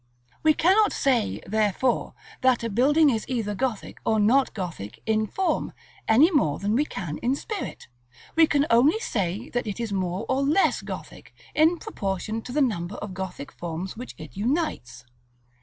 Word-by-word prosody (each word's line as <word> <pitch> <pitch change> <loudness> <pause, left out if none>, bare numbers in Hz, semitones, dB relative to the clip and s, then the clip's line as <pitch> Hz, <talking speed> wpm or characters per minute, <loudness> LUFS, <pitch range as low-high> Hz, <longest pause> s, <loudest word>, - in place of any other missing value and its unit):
We 310 -1 +4
cannot 400 +5 +4
say, 255 -6 +1
therefore, 215 +4 0 0.3
that 255 -2 +3
a 230 - -2
building 285 +7 +4
is 220 -3 -1
either 230 -5 -2
Gothic 220 0 -3
or 220 -1 +2
not 250 +6 +4
Gothic 115 - -6
in 220 0 +1
form, 380 - -1 0.3
any 275 +11 +6
more 155 - +2
than 205 +2 -1
we 280 +6 +2
can 170 - -5
in 250 +3 +1
spirit. 420 +6 -6 0.5
We 325 0 +6
can 290 -1 +2
only 265 - +5
say 205 - -2
that 245 -2 -2
it 205 +2 -4
is 230 -3 -3
more 185 +2 -2
or 260 +1 +1
less 300 +8 +2
Gothic, - - -9 0.2
in 320 +3 +4
proportion 215 - -3
to 245 - -8
the 290 +2 +3
number 190 -6 -2
of 205 -2 -6
Gothic 185 -6 -6
forms 175 +2 -5
which 245 +3 -8
it 155 - -11
unites. 240 - -2
230 Hz, 170 wpm, -25 LUFS, 195-280 Hz, 0.5 s, any